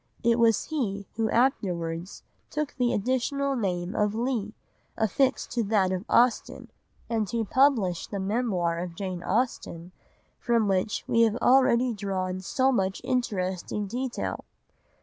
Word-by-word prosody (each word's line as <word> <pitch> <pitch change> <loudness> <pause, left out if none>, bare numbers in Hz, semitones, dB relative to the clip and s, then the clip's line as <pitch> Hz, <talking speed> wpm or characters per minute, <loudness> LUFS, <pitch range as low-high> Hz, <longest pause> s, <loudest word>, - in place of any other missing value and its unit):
It 235 0 +3
was 230 -2 +4
he 205 -10 -3
who 220 -1 0
afterwards 180 -8 -1 0.3
took 300 -1 -3
the 245 -2 +1
additional 265 +5 0
name 185 -4 -2
of 210 0 +1
Leigh, 230 -3 -2 0.4
affixed 255 +5 +1
to 240 -1 0
that 195 -3 +2
of 185 +2 -3
Austen, 245 0 +2 0.4
and 220 -4 -1
who 230 -1 -1
published 220 - +2
the 200 - -4
Memoir 190 -5 0
of 175 -1 -5
Jane 185 -1 -4
Austen 185 -5 -2 0.5
from 235 -3 +1
which 195 +1 0
we 230 - +3
have 225 -1 +4
already 250 -1 +4
drawn 190 -3 -3
so 260 +7 +1
much 190 -6 0
interesting 210 -6 -2
detail. 245 +5 -4
220 Hz, 135 wpm, -27 LUFS, 190-245 Hz, 0.5 s, was